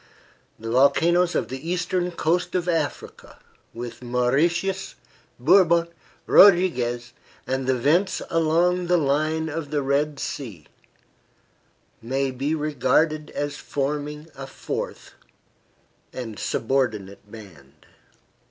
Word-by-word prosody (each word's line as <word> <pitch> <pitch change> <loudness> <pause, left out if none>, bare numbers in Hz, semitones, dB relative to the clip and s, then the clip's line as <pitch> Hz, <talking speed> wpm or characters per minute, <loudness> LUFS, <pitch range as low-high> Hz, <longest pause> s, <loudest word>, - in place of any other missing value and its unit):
The 115 +1 -6
volcanoes 165 +7 +3
of - - -1
the 135 +5 -6
eastern 180 0 -1
coast 175 +1 -1
of 180 -1 -1
Africa, 165 -4 -3 0.3
with 120 +1 -8
Mauritius, 150 +10 0 0.4
Bourbon, 170 +4 +4 0.4
Rodriguez, 125 -11 +4 0.3
and 130 0 -2
the 130 - +3
vents 160 +10 +2
along 170 +2 +2
the 180 0 +3
line 155 +2 0
of 155 -1 -5
the 145 -1 -1
Red 140 +1 0
Sea, 105 - -6 1.4
may 135 +3 -1
be 140 +5 -2
regarded 150 +1 +1
as 145 0 -3
forming 150 +2 -4
a 135 0 -8
fourth - - -6 1.0
and 115 -4 -7
subordinate 105 -6 -2
band. 85 -12 -14
145 Hz, 105 wpm, -24 LUFS, 125-170 Hz, 1.4 s, Bourbon